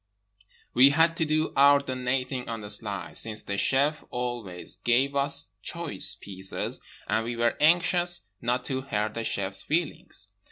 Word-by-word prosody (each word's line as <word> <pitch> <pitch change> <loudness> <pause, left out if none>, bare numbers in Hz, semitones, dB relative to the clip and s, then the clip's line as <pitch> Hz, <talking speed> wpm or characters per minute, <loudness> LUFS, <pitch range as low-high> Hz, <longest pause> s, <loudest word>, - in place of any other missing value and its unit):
We 130 +3 +7
had 165 +3 +3
to 160 - +1
do 155 +1 0
our 140 +1 +7
donating 130 -1 -2
on 115 -1 -4
the 105 0 -5
sly, 100 -6 -3
since 110 +3 0
the 100 - -3
chef 140 +8 +1
always 120 -8 -4
gave 130 +4 +1
us 140 0 0
choice 100 - -1
pieces 95 -1 -3 0.3
and 110 - +1
we 120 +1 -4
were 120 0 +1
anxious 175 +2 +3 0.2
not 125 +1 -1
to 130 -2 -2
hurt 105 -5 -2
the 115 - -4
chef's 100 -2 +3
feelings. 165 0 -3
125 Hz, 155 wpm, -27 LUFS, 110-145 Hz, 0.3 s, We